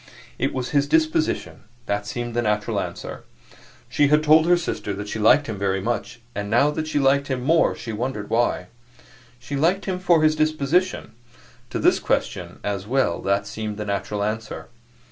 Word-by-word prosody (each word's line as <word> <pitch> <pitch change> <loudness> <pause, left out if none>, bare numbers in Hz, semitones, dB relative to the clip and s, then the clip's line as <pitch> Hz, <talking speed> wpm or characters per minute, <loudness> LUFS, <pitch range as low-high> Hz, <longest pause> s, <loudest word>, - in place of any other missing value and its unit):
It - - +1
was 130 -1 -4
his 145 -1 +2
disposition 155 +1 0 0.2
that 105 0 -2
seemed 120 +1 -4
the 120 - +1
natural 105 -2 0
answer. - - -6 0.6
She 145 - +2
had 150 +2 +3
told 155 +1 +5
her 175 0 +5
sister 105 - -3
that 100 +1 -6
she 110 - -4
liked 130 +7 +5
him 110 -5 -5
very 95 -1 0
much, 120 +3 -3
and 105 0 -4
now 140 +7 +4
that 155 +1 -3
she 155 - -1
liked 140 0 +3
him 130 -2 -2
more 165 +4 +3
she 115 - -6
wondered 110 -2 -3
why. 115 -6 +1 0.7
She 135 +3 -6
liked 170 +8 +1
him 185 -2 -2
for 175 -3 +3
his 155 0 +4
disposition; 155 0 0 0.6
to - - -3
this - - +3
question - - -2
as 100 -1 -3
well 135 +2 +1
that 100 +1 0
seemed 105 0 -5
the 105 - -4
natural 100 0 -2
answer. 110 +2 -4
125 Hz, 185 wpm, -23 LUFS, 105-155 Hz, 0.7 s, told